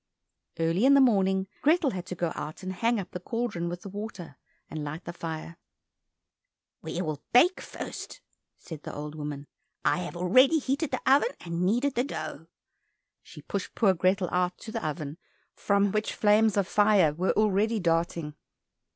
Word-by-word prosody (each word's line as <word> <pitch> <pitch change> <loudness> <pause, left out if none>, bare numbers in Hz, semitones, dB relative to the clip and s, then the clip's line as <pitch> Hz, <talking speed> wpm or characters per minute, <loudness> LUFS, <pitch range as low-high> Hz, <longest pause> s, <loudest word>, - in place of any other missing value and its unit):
Early 165 +7 +2
in 280 - +7
the - - +7
morning, 195 -7 +3 0.2
Grethel 310 -2 +3
had 180 -3 -6
to 180 - -5
go 170 -1 -1
out 155 +5 -7
and 185 0 -4
hang 230 +4 +1
up 185 -2 -6
the 180 - -5
cauldron 200 -4 -3
with 175 0 -6
the 200 - -7
water, 200 -7 -7 0.3
and 155 -1 -5
light 155 +3 -6
the 170 - -6
fire. 165 0 -6 1.2
"We 180 - -3
will 155 -3 -4
bake 335 +10 +5
first," - - -7 0.4
said 160 -3 -9
the - - -7
old 150 +1 -6
woman, 145 -2 -6 0.4
"I - - +3
have 180 -1 -5
already 255 - +5
heated 280 +1 -1
the - - -3
oven, 280 - +5
and 170 0 -4
kneaded 245 +9 +2
the 245 - +1
dough." 155 - -6 0.7
She - - -13
pushed 200 -2 -4
poor 200 -5 +4
Grethel 185 +1 +1
out 180 0 0
to 220 - -8
the 225 -1 -4
oven, 150 +1 -4 0.3
from 200 -1 +1
which 215 +1 -1
flames 210 0 +4
of 195 -2 +2
fire 205 -8 +4
were 180 +5 0
already 215 +1 +2
darting. 165 -3 0
185 Hz, 175 wpm, -28 LUFS, 170-220 Hz, 1.2 s, in